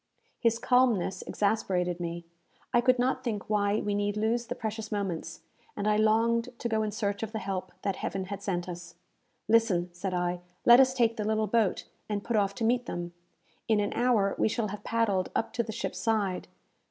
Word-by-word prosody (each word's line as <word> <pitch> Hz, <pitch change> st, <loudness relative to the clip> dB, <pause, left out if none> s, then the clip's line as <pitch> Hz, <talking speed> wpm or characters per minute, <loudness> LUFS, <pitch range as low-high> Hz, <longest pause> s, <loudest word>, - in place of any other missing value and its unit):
His 230 Hz, -1 st, +2 dB
calmness 235 Hz, -8 st, +2 dB
exasperated 180 Hz, -4 st, 0 dB
me. 170 Hz, 0 st, -4 dB, 0.5 s
I 240 Hz, -, +5 dB
could 255 Hz, +1 st, +4 dB
not 255 Hz, +1 st, 0 dB
think 215 Hz, -5 st, -3 dB
why 210 Hz, 0 st, +1 dB
we 205 Hz, -, -1 dB
need 205 Hz, 0 st, 0 dB
lose 230 Hz, +2 st, 0 dB
the -, -, -3 dB
precious 220 Hz, 0 st, -5 dB
moments, 195 Hz, -5 st, -3 dB, 0.4 s
and 205 Hz, -, -1 dB
I 210 Hz, -, +4 dB
longed 230 Hz, +2 st, +3 dB
to 235 Hz, -, -3 dB
go 220 Hz, -1 st, +1 dB
in 215 Hz, -, 0 dB
search 205 Hz, -1 st, -2 dB
of 225 Hz, 0 st, -4 dB
the -, -, -1 dB
help 190 Hz, -2 st, -4 dB
that 195 Hz, -2 st, -1 dB
Heaven 190 Hz, -1 st, -3 dB
had 200 Hz, +1 st, -6 dB
sent 175 Hz, -3 st, -2 dB
us. 175 Hz, -1 st, -8 dB, 0.5 s
"Listen," 205 Hz, -6 st, +3 dB
said 185 Hz, +1 st, -3 dB
I. 175 Hz, 0 st, -1 dB, 0.3 s
"Let 240 Hz, +1 st, +9 dB
us 260 Hz, -1 st, +5 dB
take 230 Hz, -2 st, +2 dB
the 215 Hz, -, -1 dB
little 215 Hz, +1 st, +1 dB
boat, 215 Hz, -2 st, +1 dB, 0.2 s
and 205 Hz, -1 st, -2 dB
put 235 Hz, -, -1 dB
off 200 Hz, -1 st, +1 dB
to 235 Hz, -, -4 dB
meet 245 Hz, +2 st, +1 dB
them. 175 Hz, 0 st, -4 dB, 0.5 s
In 220 Hz, -2 st, +3 dB
an 205 Hz, 0 st, -1 dB
hour 230 Hz, -5 st, +2 dB
we -, -, +4 dB
shall 215 Hz, -1 st, -1 dB
have 205 Hz, +1 st, -7 dB
paddled 210 Hz, -5 st, +1 dB
up 225 Hz, -, -1 dB
to 235 Hz, -, +1 dB
the 225 Hz, -, -5 dB
ship's 230 Hz, -, -4 dB
side. 205 Hz, -5 st, 0 dB
210 Hz, 200 wpm, -29 LUFS, 195-230 Hz, 0.5 s, Let